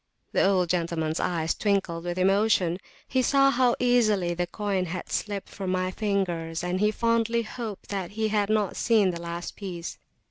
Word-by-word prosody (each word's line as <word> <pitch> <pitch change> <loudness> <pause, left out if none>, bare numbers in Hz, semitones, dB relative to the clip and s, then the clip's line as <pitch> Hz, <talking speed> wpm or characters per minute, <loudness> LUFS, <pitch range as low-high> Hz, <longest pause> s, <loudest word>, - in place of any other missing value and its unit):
The - - +2
old 190 -2 +3
gentlemans 165 -2 -1
eyes 165 -3 0
twinkled 190 -5 -1
with 175 0 -3
emotion: 190 -2 +2 0.3
he 260 - +1
saw 275 +2 +4
how 250 -2 +3
easily 215 -8 +2
the 175 +1 -2
coin 200 -3 -1
had 180 +2 -6
slipped 205 -2 -3
from 190 -2 -5
my 185 0 0
fingers, 175 -6 -1
and 180 +1 -1
he 210 +1 +3
fondly 230 +1 +1
hoped 220 -2 -7
that 195 -2 -4
he 220 0 +1
had 205 -1 +1
not 215 -3 +1
seen 215 -5 +3
the 170 -1 -6
last 170 0 -5
piece. 175 -4 -6
195 Hz, 175 wpm, -26 LUFS, 175-215 Hz, 0.3 s, saw